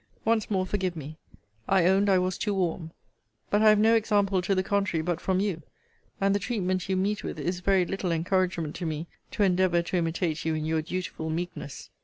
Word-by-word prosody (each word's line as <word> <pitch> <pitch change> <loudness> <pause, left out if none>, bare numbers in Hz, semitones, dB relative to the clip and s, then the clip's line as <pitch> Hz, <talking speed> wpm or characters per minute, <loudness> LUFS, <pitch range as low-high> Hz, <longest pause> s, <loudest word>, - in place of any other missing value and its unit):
Once 220 -1 +1
more 190 -3 +1
forgive 185 -2 -2
me. 155 0 -7 0.5
I 190 -3 +3
owned 195 +2 +4
I 190 - +5
was 185 0 0
too 205 -2 -1
warm. 175 -3 -1 0.6
But 205 - +3
I 220 - +7
have 215 - +6
no 220 +2 +4
example 205 -4 +2
to 195 +2 0
the 185 - +1
contrary 195 -5 0
but 175 0 -2
from 190 -1 +1
you: 190 -5 -1 0.6
and 195 0 +2
the 200 - +1
treatment 185 -5 -2
you 190 - +1
meet 205 +3 -1
with - - -5
is 175 +5 -2
very 190 0 +2
little 190 -1 -2
encouragement 170 -1 0
to 175 - -3
me 155 +1 -3 0.2
to 210 - 0
endeavour 180 -2 +3
to 180 - -2
imitate 165 -1 -1
you 160 -1 0
in 155 0 -2
your 160 0 0
dutiful 165 -1 -4
meekness. 165 -3 -5
185 Hz, 210 wpm, -27 LUFS, 170-195 Hz, 0.6 s, I